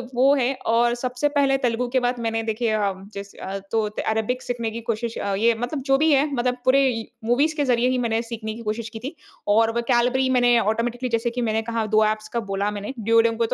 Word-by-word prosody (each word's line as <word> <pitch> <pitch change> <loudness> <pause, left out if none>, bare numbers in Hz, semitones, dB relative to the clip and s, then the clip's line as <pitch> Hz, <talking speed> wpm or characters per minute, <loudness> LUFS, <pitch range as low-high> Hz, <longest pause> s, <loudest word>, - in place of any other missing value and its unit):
वो 265 +3 +5
है 265 0 +1
और 235 +1 +3
सबसे 250 +3 -1
पहले 280 -2 +2
तेलुगु 245 -1 -1
के 260 +1 +2
बाद 245 0 -1
मैंने 225 -1 -1
देखिए 225 +1 -1
अ, 205 -2 +1 0.2
जैसे 200 0 -9
अ, 195 +1 -5
तो 225 -1 +2 0.3
अरेबिक 220 +3 -1
सीखने 235 -2 -3
की 230 +1 -6
कोशिश 230 0 -3
अ, 200 - -2
ये 230 +3 +3
मतलब 250 +4 -3
जो 270 0 +4
भी 315 +1 +3
है 280 +1 +4
मतलब 250 0 0
पूरे 265 +2 +5 0.4
मूवीज़ 285 +7 +2
के 290 - +1
ज़रिए 245 -1 +2
ही 255 - +1
मैंने 230 -2 0
सीखने 225 -2 -6
की 230 - -9
कोशिश 220 +2 -3
की 220 0 -8
थी। 270 +7 -7 0.3
और 225 +2 +4
वोकैब्यलेरी 245 +2 +2
मैंने 245 -2 +4
ऑटोमैटिकली 235 +3 -1
जैसे 230 0 0
कि 245 +1 -3
मैंने 220 -1 0
कहा 230 -1 -2
2 215 - +6
एप्स 215 0 -1
का 235 - +1
बोला 200 +1 0
मैंने 205 +4 -5
दुओलिंगों 230 +1 +3
को 230 - +3
235 Hz, 225 wpm, -23 LUFS, 220-250 Hz, 0.4 s, 2